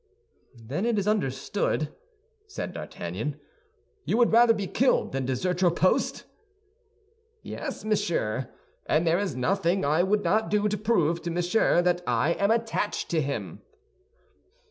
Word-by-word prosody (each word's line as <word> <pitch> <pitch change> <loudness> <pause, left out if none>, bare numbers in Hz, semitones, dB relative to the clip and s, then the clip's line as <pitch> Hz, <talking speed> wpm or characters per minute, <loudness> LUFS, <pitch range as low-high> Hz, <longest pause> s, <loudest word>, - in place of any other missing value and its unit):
"Then 120 - -5
it 235 -2 +1
is 200 0 -1
understood," 155 -3 -1 0.5
said 400 - -6
D'Artagnan; - - -5 0.6
"you 220 - 0
would 240 -1 +4
rather 235 0 +7
be 205 -2 -3
killed 255 +7 +1
than 130 -1 -2
desert 180 +8 -1
your 180 - +5
post?" 185 +2 +1 1.2
"Yes, - - -6
monsieur; 165 - -1 0.4
and 155 +3 +2
there 165 +2 +3
is 200 -9 -2
nothing 185 +7 +1
I 155 +4 +3
would 205 +3 +1
not 220 +1 +1
do 210 0 +2
to 210 - -1
prove 175 -6 +1
to 170 - -4
Monsieur 175 +1 +2
that 180 0 +1
I 125 +6 +2
am 200 - +2
attached 225 -2 -1
to 165 -2 +1
him." 140 0 -4
180 Hz, 145 wpm, -26 LUFS, 155-210 Hz, 1.2 s, rather